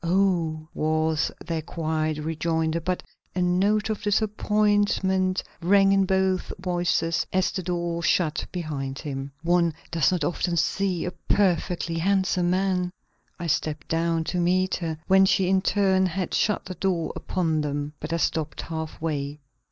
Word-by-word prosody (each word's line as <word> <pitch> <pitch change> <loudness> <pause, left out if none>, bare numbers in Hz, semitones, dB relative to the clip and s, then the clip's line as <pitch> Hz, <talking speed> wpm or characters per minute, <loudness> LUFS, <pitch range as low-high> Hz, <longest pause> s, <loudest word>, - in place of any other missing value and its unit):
"Oh!" 170 -3 +1
was 155 0 +1
their 165 -2 -2
quiet 155 -1 -2
rejoinder, 160 +1 -1
but 180 +2 -2 0.3
a 180 - 0
note 200 +5 +2
of 215 - -3
disappointment 205 -2 +1 0.2
rang 195 +3 +5
in 195 -1 +4
both 190 -1 +1
voices 175 -2 0
as 185 0 +1
the 185 - -3
door 170 -1 -2
shut 160 -1 +1
behind 140 -6 -4
him. 140 -1 -5
"One 170 -2 +2 0.2
does 165 -2 +3
not 180 -4 0
often 175 +2 -1
see 180 +2 0
a 180 - -2
perfectly 175 -4 0
handsome 185 -1 +2
man." 185 -1 +1 0.5
I 175 - -5
stepped 155 -1 -1
down 165 0 +1
to 180 - -3
meet 185 +2 +2
her 165 -3 -3
when 190 0 +5
she 190 -1 +3
in 190 0 +3
turn 190 -1 +3
had 185 0 -3
shut 210 - +1
the 185 - -5
door 180 -2 -1
upon 160 -4 -1
them. 145 0 -3
But 155 - -6
I 165 - +1
stopped 160 -2 -1
half 160 -1 -5
way. 150 -2 -3
175 Hz, 150 wpm, -25 LUFS, 160-190 Hz, 0.5 s, rang